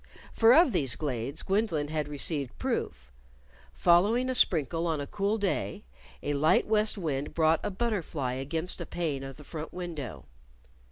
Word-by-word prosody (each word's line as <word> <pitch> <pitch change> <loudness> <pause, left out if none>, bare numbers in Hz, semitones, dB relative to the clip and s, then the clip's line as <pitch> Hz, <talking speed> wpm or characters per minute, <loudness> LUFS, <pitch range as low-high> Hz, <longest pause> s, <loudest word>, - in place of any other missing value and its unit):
For 225 0 +5
of 330 -3 +6
these 135 - +1
glades 140 0 -3
Gwendolyn 190 -8 0
had 155 -2 -2
received 145 -2 -2
proof: 60 +1 -3 0.6
Following 210 - +3
a - - 0
sprinkle 165 - +2
on 160 -2 -1
a 145 - -3
cool 205 +6 -1
day, 205 0 -2 0.4
a 145 - -1
light 150 +2 +3
west 215 0 +3
wind 145 -6 -3
brought 160 0 +3
a 210 - -2
butterfly 185 - -2
against 160 +7 -2
a - - -5
pane 155 -6 -2
of 135 -1 -8
the 150 - -12
front 155 +1 -7
window. 165 - -6
160 Hz, 160 wpm, -29 LUFS, 145-200 Hz, 0.6 s, of